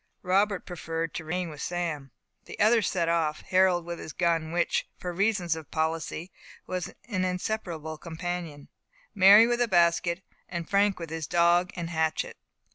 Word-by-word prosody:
Robert 195 +1 +1
preferred 165 -2 -4
to 165 - -5
remain 175 +1 -3
with 150 - -9
Sam. 165 -6 -3 0.4
The - - -10
others 220 -1 +4
set 170 -3 0
off 160 -2 0
Harold 185 -2 +2
with 170 0 -5
his 155 - -8
gun, 165 -2 0
which, 175 0 0
for 180 -1 -5
reasons 190 -3 +1
of 160 -2 -9
policy, 160 +2 -2 0.3
was 185 -1 -4 0.2
an 195 -6 -1
inseparable 180 -4 -3
companion, 165 -3 -5 0.5
Mary 200 +3 +8
with 240 0 0
a 240 - +3
basket, 170 -1 +2 0.3
and 170 -2 -4
Frank 200 -1 +2
with 165 -2 -7
his 160 -2 -4
dog 175 +1 +3
and 170 -1 -4
hatchet. 160 -1 -1
175 Hz, 160 wpm, -27 LUFS, 165-185 Hz, 0.5 s, Mary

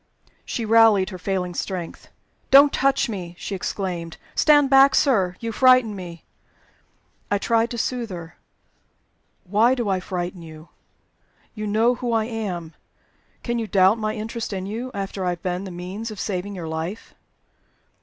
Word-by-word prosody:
She 230 - -3
rallied 220 -3 +5
her 185 - -8
failing 180 -1 -2
strength. 175 -1 -5 0.4
"Don't 280 +1 +7
touch 275 0 +2
me!" 180 -6 -6
she 200 - -6
exclaimed. 180 -3 -4 0.2
"Stand 290 -2 +5
back, 270 +1 +6
sir. 195 -10 +2
You 230 -1 -4
frighten 255 -2 +4
me." 175 -3 -9 1.1
I 205 - +2
tried 230 +3 +1
to 240 - -5
soothe 240 0 -2
her. 170 -3 -8 1.1
"Why 215 +7 +3
do 240 -5 -2
I 190 -1 +1
frighten 180 -1 -5
you? 160 0 -12 0.8
You 215 -2 -5
know 225 +4 +3
who 245 -1 -3
I 220 -1 +1
am. 190 -8 -5 0.7
Can 240 -1 -1
you 225 - -3
doubt 195 +2 +4
my 215 0 -2
interest 225 0 -5
in 190 -1 -4
you, 230 +6 -5
after 195 -1 -4
I 180 - 0
have - - -38
been 180 +1 -2
the - - -6
means 185 +6 -6
of 215 -3 -8
saving 200 0 -3
your 170 -3 -6
life?" 160 +7 -5
205 Hz, 160 wpm, -23 LUFS, 180-230 Hz, 1.1 s, Don't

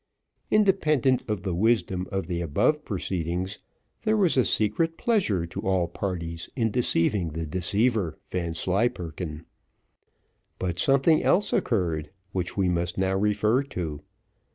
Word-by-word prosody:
Independent 155 - +3
of 105 -4 -2
the 95 -3 -2
wisdom 95 -2 +1
of 95 0 -2
the 85 -2 -3
above 120 - +1
proceedings, 90 - -3 0.4
there 220 -1 +2
was 190 -5 +3
a 130 - +4
secret 165 +12 +1
pleasure 180 - +1
to 85 - -6
all 95 -2 +1
parties 85 -2 -4
in 115 -4 +1
deceiving 90 -7 +1
the 80 +1 -3
deceiver 95 +1 0
Vanslyperken. 85 -2 -2 1.1
But 90 -1 -2
something 140 - +4
else 205 - +2
occurred 85 - 0 0.2
which 90 -1 -3
we 95 -2 +2
must 85 -1 -1
now 95 0 +1
refer 105 +5 +2
to. 85 - -5
95 Hz, 130 wpm, -26 LUFS, 85-120 Hz, 1.1 s, a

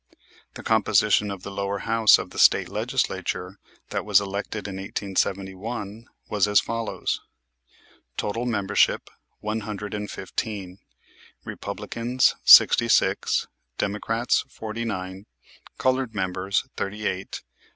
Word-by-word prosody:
The - - -9
composition 105 - +3
of 100 -2 -6
the 100 - -6
lower 100 0 -2
house 115 +1 +5
of - - -7
the - - -7
State - - +5
Legislature 90 +2 -2 0.3
that - - -2
was - - +5
elected 100 +1 -4
in 95 -1 -6
1871 100 +3 -3 0.2
was 105 -1 +1
as 105 -2 +5
follows: 115 -1 -3 1.0
Total 115 +4 -2
membership, 100 -4 +1 0.3
one 105 +1 -2
hundred 105 -1 -6
and 105 0 -4
fifteen. 95 -1 -5 0.7
Republicans, 120 +2 -1
sixty - - +8
six; - - +2 0.3
Democrats, 115 +4 0
forty 110 +1 -5
nine. 95 -2 -5 0.5
Colored 130 -3 0
members, 95 0 -1
thirty 105 +2 -4
eight. 95 +1 -3
105 Hz, 115 wpm, -25 LUFS, 95-110 Hz, 1.0 s, sixty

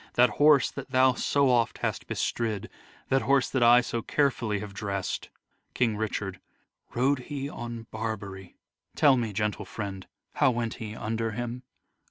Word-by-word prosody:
That 125 -2 +5
horse 150 -2 +6
that - - -8
thou 130 0 +4
so 140 +1 +2
oft 120 -2 +2
hast - - -3
bestrid, 110 -4 -2 0.4
That 135 - +3
horse 135 +3 +2
that 130 - 0
I 120 +1 +7
so 120 -1 -3
carefully 120 -6 0
have 100 0 -7
dress 100 -2 -2
'd. - - -14 0.5
King 115 -4 +2
Richard: 100 -3 -3 0.6
Rode 130 +3 +2
he 140 +1 -5
on 120 -4 -7
Barbary? 100 -4 -5 0.4
Tell 140 -3 +5
me, 115 -4 -1
gentle 105 +1 -1
friend, 95 -2 -6 0.3
How - - +4
went 120 -2 -2
he 110 -1 -5
under 115 0 -2
him 120 +1 -4
115 Hz, 160 wpm, -28 LUFS, 105-130 Hz, 0.6 s, I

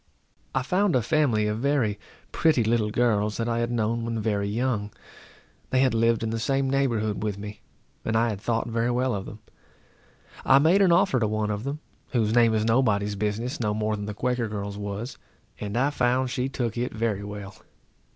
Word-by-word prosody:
I 130 - +1
found 185 +4 +1
a 125 - +2
family 125 -6 +2
of 105 +1 -1
very 125 -6 +1 0.3
pretty 155 -7 +3
little 110 -1 +1
girls 105 -2 +1
that 115 - -1
I 115 0 0
had 120 0 0
known 115 0 0
when 115 -1 -2
very 105 -2 0
young. 110 -1 -1 0.8
They 130 - +2
had 130 -2 +3
lived 115 0 +2
in 110 - -1
the 115 - -2
same 135 +3 0
neighborhood 120 -6 0
with 105 -2 -2
me, 105 0 -8 0.4
and 110 - -1
I 115 +1 +2
had 100 -3 -4
thought 115 0 0
very 115 +1 0
well 125 +1 +1
of 100 -1 -4
them. 105 +1 -10 1.0
I 135 - +6
made 165 +8 +4
an 190 -3 +5
offer 170 -6 +4
to 110 - +1
one 105 0 -1
of 105 +3 -4
them, 145 +2 -4 0.3
whose 110 -3 +2
name 115 -2 +4
is 110 0 +1
nobody's 105 -4 +2
business, 110 +7 -2
no 105 -3 0
more 110 0 0
than 105 -1 -5
the 105 - -5
Quaker 125 +1 -1
girl's 100 -1 -5
was, 105 +4 -5 0.4
and 105 +2 -3
I 135 +4 +2
found 125 -1 +1
she 125 +2 -1
took 120 -3 -3
it 125 - -2
very 110 -3 -1
well. 105 -1 -7
115 Hz, 200 wpm, -26 LUFS, 105-125 Hz, 1.0 s, I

